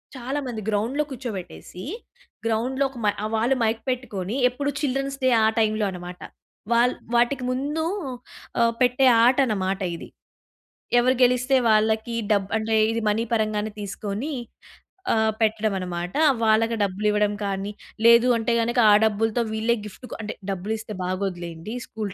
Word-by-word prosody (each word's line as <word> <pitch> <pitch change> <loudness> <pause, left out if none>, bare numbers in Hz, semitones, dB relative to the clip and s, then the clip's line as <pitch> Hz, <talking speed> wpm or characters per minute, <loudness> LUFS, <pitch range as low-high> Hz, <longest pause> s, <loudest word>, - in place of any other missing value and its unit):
చాలా 260 +3 -3
మంది 230 -3 -4
గ్రౌండ్‌లో 230 +8 0
కూర్చోబెట్టేసి. 215 -7 -7 0.6
గ్రౌండ్‌లో 245 +5 0
ఒక 265 - -13
మై 205 - +3
ఆహ్, 215 - -3
వాళ్ళు 235 +4 +2
మైక్ 225 0 0
పెట్టుకొని 220 -5 -3
ఎప్పుడు 285 +3 -3
చిల్డ్రన్స్ 275 0 -1
డే 260 - +4
ఆ - - +5
టైంలో 215 -1 +1
అన్నమాట. 180 -1 -8 0.5
వాళ్ళ 240 +1 +4 0.2
వాటికి 245 +2 +2
ముందు 290 +5 -2 1.0
పెట్టే 250 +2 +4
ఆహ్, 230 - +5
ఆటన్నమాట 210 -7 +1 0.2
ఇది. - - -10 0.9
ఎవరు 255 +2 +3
గెలిస్తే 250 +2 +3
వాళ్ళకి 220 +1 +2 0.2
డబ్బు 200 -2 +2
అంటే 220 0 0 0.2
ఇది 230 0 -1
మనీ 220 +2 +1
పరంగానే 215 -1 0
తీసుకొని 205 +7 -4 0.8
ఆహ్, 220 0 +2
పెట్టడమన్నమాట. 190 -5 -1 0.3
వాళ్ళకి 225 +1 +3
డబ్బులివ్వడం 210 +1 +1
కానీ 195 +1 -3 0.3
లేదు 235 +1 +7
అంటే 230 +1 0
గనక 240 +2 0
ఆ - - +7
డబ్బులతో 220 +2 +1
వీళ్ళే 225 +2 +1
గిఫ్ట్ 210 +5 -10
కొ - - -4
అంటే 210 - -4 0.2
డబ్బులిస్తే 215 +3 -4
బాగోదులెండి 180 +1 -4
స్కూలు 215 -3 -5
220 Hz, 135 wpm, -24 LUFS, 205-245 Hz, 1.0 s, లేదు